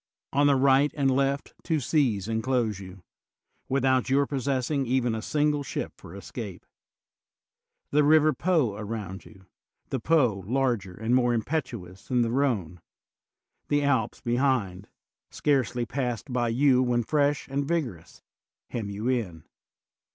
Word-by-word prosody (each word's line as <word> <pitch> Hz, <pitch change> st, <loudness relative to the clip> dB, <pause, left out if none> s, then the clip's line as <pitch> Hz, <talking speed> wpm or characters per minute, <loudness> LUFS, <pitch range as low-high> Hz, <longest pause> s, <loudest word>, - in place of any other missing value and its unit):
On 145 Hz, +1 st, +4 dB
the 140 Hz, -, +5 dB
right 135 Hz, +2 st, +4 dB
and 135 Hz, -2 st, +2 dB
left 140 Hz, +1 st, 0 dB
two 160 Hz, -2 st, 0 dB
seas 120 Hz, -, +1 dB
enclose 115 Hz, -2 st, 0 dB
you, 95 Hz, -1 st, -11 dB, 0.7 s
without 130 Hz, -1 st, +2 dB
your 140 Hz, +1 st, +3 dB
possessing 135 Hz, 0 st, -1 dB
even 125 Hz, -1 st, +1 dB
a 110 Hz, -, -3 dB
single 150 Hz, +3 st, +1 dB
ship 140 Hz, -, -4 dB
for 85 Hz, -, -12 dB
escape. 100 Hz, 0 st, -8 dB, 1.3 s
The 150 Hz, +1 st, +4 dB
river 155 Hz, +1 st, +5 dB
Po 155 Hz, -, +1 dB
aground 105 Hz, -3 st, -6 dB
you, 95 Hz, -2 st, -16 dB, 0.5 s
the 135 Hz, -, -1 dB
Po 120 Hz, -8 st, +2 dB
larger 120 Hz, -7 st, 0 dB
and 110 Hz, +4 st, -1 dB
more 120 Hz, -1 st, +3 dB
impetuous 115 Hz, -, -4 dB
than 125 Hz, -2 st, +2 dB
the 115 Hz, -, -1 dB
Rhone; 110 Hz, -, -1 dB, 0.9 s
the 145 Hz, 0 st, +1 dB
Alps 130 Hz, -6 st, 0 dB
behind, 120 Hz, -7 st, 0 dB, 0.4 s
scarcely 130 Hz, -4 st, 0 dB
passed 125 Hz, 0 st, -3 dB
by 120 Hz, -1 st, +1 dB
you 130 Hz, +2 st, +4 dB
when 120 Hz, -1 st, +1 dB
fresh 145 Hz, +2 st, +1 dB
and 140 Hz, +1 st, -1 dB
vigorous, 120 Hz, -, -3 dB, 0.5 s
hem 110 Hz, -4 st, -3 dB
you 105 Hz, +4 st, -4 dB
in. 105 Hz, -11 st, -1 dB
125 Hz, 135 wpm, -27 LUFS, 110-140 Hz, 1.3 s, the